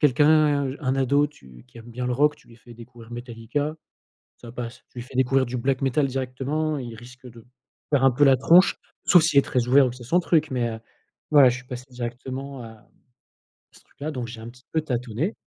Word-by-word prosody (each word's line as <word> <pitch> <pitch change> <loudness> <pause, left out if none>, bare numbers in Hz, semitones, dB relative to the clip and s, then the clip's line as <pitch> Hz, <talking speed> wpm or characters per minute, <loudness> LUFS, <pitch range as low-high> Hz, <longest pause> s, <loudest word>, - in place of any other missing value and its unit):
quelqu'un, 145 0 +3
un 135 -2 -1
ado 140 +2 +2
tu 65 - -17
qui 120 - -15
aime 115 +1 -12
bien 125 +1 -4
le 125 - -1
rock 150 +4 +2
tu - - -24
lui 115 - -16
fais 120 0 -15
découvrir 115 0 -14
Metallica 120 +6 -4 0.6
ça 120 -1 -12
passe. 120 -1 -7
Tu 125 - -12
lui - - -4
fais 125 +1 -11
découvrir 130 +1 +2
du 125 +1 -4
black 130 +2 -1
metal 135 +2 +1
directement, 135 +4 -2
il 120 -3 -7
risque 125 +3 -14
de 115 -2 -14 0.4
faire 140 -3 +2
un 135 - +6
peu 130 +4 -1
la 135 -2 +6
tronche, 175 +9 +5 0.3
sauf 175 -3 +6
s'il 160 -3 +3
est 140 - +7
très 125 -2 -1
ouvert 135 +1 +6
ou - - -2
que 120 - -10
c'est 125 - -11
son 170 +10 +2
truc 160 -3 +1
mais 125 -2 -1
heu, 110 -1 -6 0.5
voilà 145 -4 +7
je 125 - 0
suis 125 - -11
passé 125 0 -7
directement 130 +2 -6
à 110 -2 -13 0.9
ce - - -19
truc - - -34
là, 150 +2 -3
donc 125 -3 -5
j'ai 115 -1 -9
un 115 - -9
petit 125 +2 -16
peu 160 - +1
tâtonné. 125 - -3
130 Hz, 230 wpm, -24 LUFS, 120-145 Hz, 0.9 s, est